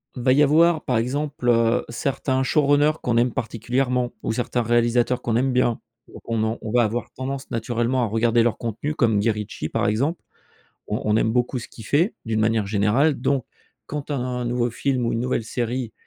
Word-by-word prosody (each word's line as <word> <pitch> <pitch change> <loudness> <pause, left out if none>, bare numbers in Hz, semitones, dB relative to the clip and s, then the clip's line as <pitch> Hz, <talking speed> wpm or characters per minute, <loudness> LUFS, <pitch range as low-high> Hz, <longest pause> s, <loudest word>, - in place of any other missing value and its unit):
Il 125 - -5
va 130 +1 +3
y 145 +3 +5
avoir 160 +2 +4
par 125 - +1
exemple, 135 +2 -1
heu, 115 0 +3
certains 130 +1 -1
showrunners 145 +2 +3
qu'on 120 -1 0
aime 120 0 +3
particulièrement 125 +2 -1
ou - - -2
certains 120 +1 -1
réalisateurs 120 +1 +1
qu'on 115 - 0
aime 130 +3 +2
bien 125 -2 +1 0.3
ou - - -12
qu'on 115 -2 -2
en 110 +1 -2
on 110 - -5
va 120 +1 +4
avoir 115 +2 -2
tendance 135 +1 -5
naturellement 120 +2 -1
à - - +1
regarder 115 +2 +2
leurs 120 -1 0
contenus 120 +6 -3
comme 110 -5 +2
Guy 110 +2 +2
Ritchie 105 -1 -5
par - - 0
exemple. 135 +11 0 0.7
On - - -2
on 105 0 +2
aime 110 0 +2
beaucoup 125 +2 0
ce 120 - -7
qu'il 110 - -13
fait, 165 - +1
d'une 115 -1 -1
manière 110 -1 +1
générale 110 +9 +2
donc 135 -4 0 0.4
quand 150 0 -5
un 125 -2 -2
nouveau 120 0 0
film 130 +1 -1
ou - - 0
une 115 - -1
nouvelle 125 -2 -1
série 120 0 -3
120 Hz, 200 wpm, -23 LUFS, 115-130 Hz, 0.7 s, y